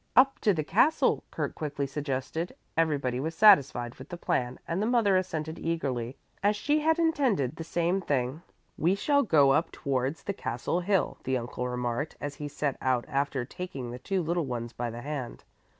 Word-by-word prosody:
"Up 270 +3 +5
to 210 - +3
the 160 -5 0
castle," 250 - +3
Kurt - - -3
quickly 145 -2 -3
suggested. 140 +4 -3 0.2
Everybody 140 -6 +1
was 160 +4 -3
satisfied 140 - +5
with 130 - -12
the 175 - -6
plan 125 -6 -1
and 170 +4 -1
the 215 - +1
mother 230 -5 +3
assented 160 -4 -2
eagerly, 135 -7 -2 0.2
as 205 +1 +3
she 290 +9 +1
had 320 +2 +2
intended 265 - +1
the 165 - -6
same 175 +3 0
thing. 135 -1 -1 0.4
"We 175 +5 +3
shall 285 +7 +3
go 145 - +5
up 160 +4 +2
towards 135 +2 -2
the 200 - -2
castle 125 - -2
hill," 190 +1 0
the 130 0 0
uncle 125 +1 -4
remarked 125 +3 -2
as 145 0 -4
he 150 - -6
set 145 -1 -2
out 130 -2 +1
after 140 -2 -1
taking 160 -6 -6
the 125 - -7
two 190 +5 -1
little 170 -1 0
ones 120 -2 -4
by 120 +1 -3
the 115 +1 -7
hand. 140 -3 -5
150 Hz, 185 wpm, -29 LUFS, 130-185 Hz, 0.4 s, Up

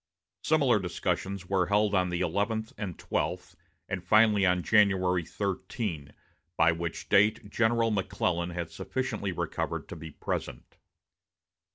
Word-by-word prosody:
Similar 140 -8 +3
discussions 95 +1 -2
were 95 -2 +1
held 105 +1 +2
on 90 -2 +2
the 90 0 -2
eleventh 105 +5 -1
and 95 -5 -5
twelfth, - - -3 0.3
and 95 -2 -4
finally, 105 0 +4
on 90 -1 +2
January 95 -4 +3
13, 95 - -4 0.5
by 80 0 +5
which 85 0 -4
date 105 +1 +3
General 115 0 +2
McClellan 90 -3 -1
had 85 -2 -5
sufficiently - - -3
recovered - - -3
to - - -6
be 80 0 -8
present. - - -5
95 Hz, 130 wpm, -29 LUFS, 85-105 Hz, 0.5 s, by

